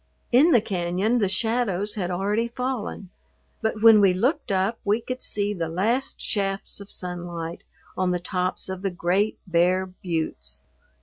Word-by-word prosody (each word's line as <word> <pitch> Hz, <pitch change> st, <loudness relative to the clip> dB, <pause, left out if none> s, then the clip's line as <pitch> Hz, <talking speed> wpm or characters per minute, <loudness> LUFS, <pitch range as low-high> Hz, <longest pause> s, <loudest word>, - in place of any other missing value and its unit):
In 270 Hz, +7 st, +6 dB
the 235 Hz, -7 st, +5 dB
cañon 190 Hz, +4 st, 0 dB
the 200 Hz, -4 st, +2 dB
shadows 205 Hz, -1 st, 0 dB
had 185 Hz, -4 st, -2 dB
already 205 Hz, +6 st, 0 dB
fallen, 240 Hz, -6 st, -4 dB, 0.5 s
but 220 Hz, -1 st, -1 dB
when 225 Hz, -2 st, +8 dB
we 190 Hz, -2 st, +5 dB
looked 255 Hz, -, 0 dB
up 195 Hz, +4 st, +1 dB
we 205 Hz, +2 st, +2 dB
could 255 Hz, +2 st, -5 dB
see 205 Hz, 0 st, 0 dB
the 165 Hz, -4 st, -3 dB
last 225 Hz, +11 st, -1 dB
shafts 195 Hz, -2 st, -2 dB
of 200 Hz, 0 st, -11 dB
sunlight 175 Hz, -2 st, -5 dB, 0.3 s
on 185 Hz, -1 st, +1 dB
the 180 Hz, 0 st, 0 dB
tops 180 Hz, +1 st, -1 dB
of 190 Hz, -1 st, -5 dB
the 195 Hz, -, 0 dB
great 185 Hz, +4 st, 0 dB
bare 180 Hz, +1 st, +2 dB
buttes. 160 Hz, -, -4 dB
195 Hz, 160 wpm, -25 LUFS, 180-220 Hz, 0.5 s, when